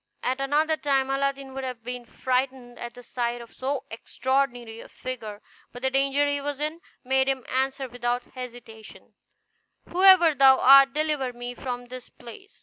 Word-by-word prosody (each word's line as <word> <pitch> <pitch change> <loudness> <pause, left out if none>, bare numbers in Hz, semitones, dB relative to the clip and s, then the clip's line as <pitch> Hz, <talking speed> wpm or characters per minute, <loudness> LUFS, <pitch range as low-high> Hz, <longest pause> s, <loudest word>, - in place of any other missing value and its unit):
At 260 +2 -1
another 305 +3 +1
time 270 -2 0
Aladdin 275 0 -2
would 270 0 -5
have 250 -3 -6
been 250 0 -6
frightened 255 0 -2
at 240 0 -7
the 245 - -12
sight 240 -1 -3
of 235 -1 -12
so 270 +1 -3
extraordinary 245 -1 -2
a - - -12
figure, 220 -5 -7 0.3
but 245 +1 -11
the 265 - +1
danger 275 +2 +2
he 285 0 -1
was 285 0 -4
in 310 +3 -3 0.2
made 265 +1 +2
him 265 -2 -1
answer 265 +1 -1
without 245 0 -2
hesitation, 240 -3 -11 0.7
"Whoever 365 -3 +6
thou 270 -1 +6
art, 275 +1 +7
deliver 300 -4 -1
me 245 0 -7
from 245 -1 -5
this 255 0 -9
place." 245 - -14
265 Hz, 165 wpm, -25 LUFS, 245-275 Hz, 0.7 s, art